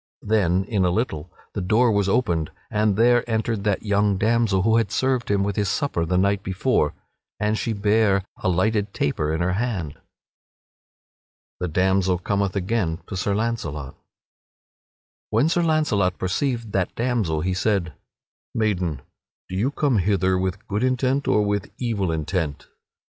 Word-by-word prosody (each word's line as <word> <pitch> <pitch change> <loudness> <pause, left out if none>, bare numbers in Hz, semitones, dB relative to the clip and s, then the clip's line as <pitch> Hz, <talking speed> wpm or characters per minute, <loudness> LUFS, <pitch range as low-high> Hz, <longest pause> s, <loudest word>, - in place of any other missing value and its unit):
Then, 95 -4 +2
in 100 -1 0
a 90 - +3
little, 90 -5 -2 0.2
the 100 - -3
door 110 +6 +3
was 100 -2 +1
opened 85 -9 +1 0.2
and 105 -1 +2
there 120 +2 +4
entered 110 -2 -1
that 100 -2 0
young 100 -1 +2
damsel 110 -2 +2
who 115 +2 +4
had 110 -4 0
served 130 +4 0
him 100 -1 +2
with 100 -1 -1
his 100 -2 +1
supper 135 - -1
the 90 - +1
night 100 +1 +2
before, 95 - 0 0.4
and 105 +1 +1
she 115 - -2
bare 105 -2 +2
a 95 - -1
lighted 100 +3 0
taper 75 +1 0
in 80 +1 -1
her 90 +1 +1
hand. 100 -7 -2
[Sidenote: 70 - -17 1.6
The 90 - -1
damsel 95 +2 +2
cometh 100 +1 -1
again 95 -4 0
to 100 - -7
Sir 100 +2 0
Launcelot] 80 - -3 1.3
When 115 +7 +3
Sir 175 +1 +2
Launcelot 150 - +1
perceived 115 +4 -1
that 95 -2 -1
damsel 115 -11 0
he 90 +3 0
said: 95 -4 0 0.6
"Maiden, 90 - -1 0.5
do 95 - -5
you 110 +8 +1
come 140 -5 +1
hither 95 -1 +2
with 95 0 -2
good 105 +3 -1
intent 130 +2 +1
or 105 - +3
with 100 -2 -1
evil 105 -8 -1
intent?" 80 -1 -2
100 Hz, 160 wpm, -23 LUFS, 90-115 Hz, 1.6 s, there